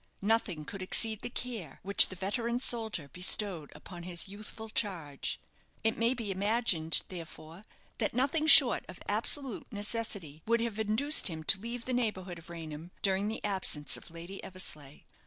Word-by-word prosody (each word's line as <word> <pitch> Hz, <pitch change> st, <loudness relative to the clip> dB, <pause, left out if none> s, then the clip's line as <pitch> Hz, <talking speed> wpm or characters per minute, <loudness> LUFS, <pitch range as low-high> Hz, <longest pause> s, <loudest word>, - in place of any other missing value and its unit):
Nothing 200 Hz, -7 st, 0 dB
could 195 Hz, +5 st, -8 dB
exceed 220 Hz, +3 st, +1 dB
the -, -, -4 dB
care 230 Hz, -, -5 dB
which 200 Hz, +1 st, +6 dB
the 185 Hz, -, -8 dB
veteran 230 Hz, +6 st, -2 dB
soldier 220 Hz, -, +1 dB
bestowed 180 Hz, -3 st, +1 dB
upon 175 Hz, -2 st, -10 dB
his 175 Hz, 0 st, -1 dB
youthful 215 Hz, +2 st, -7 dB
charge. 175 Hz, -10 st, -3 dB, 0.4 s
It 225 Hz, 0 st, +2 dB
may 235 Hz, +3 st, +1 dB
be 225 Hz, -5 st, -4 dB
imagined, 195 Hz, -5 st, +2 dB
therefore, 165 Hz, -1 st, -10 dB, 0.4 s
that -, -, -1 dB
nothing 285 Hz, +5 st, +1 dB
short -, -, +9 dB
of -, -, -10 dB
absolute 270 Hz, -7 st, -2 dB
necessity 205 Hz, -7 st, -3 dB
would 230 Hz, +1 st, +3 dB
have 230 Hz, -2 st, -3 dB
induced 220 Hz, +8 st, +2 dB
him 160 Hz, -3 st, -4 dB
to 190 Hz, -, +5 dB
leave 235 Hz, +2 st, -6 dB
the 255 Hz, -, -2 dB
neighbourhood 190 Hz, -8 st, -2 dB
of 165 Hz, +2 st, -14 dB
Raynham 165 Hz, -1 st, -8 dB
during 195 Hz, +1 st, +2 dB
the 220 Hz, -, -4 dB
absence 185 Hz, -8 st, 0 dB
of -, -, -9 dB
Lady 170 Hz, +4 st, -9 dB
Eversleigh. 150 Hz, -6 st, -3 dB
200 Hz, 160 wpm, -31 LUFS, 170-230 Hz, 0.4 s, short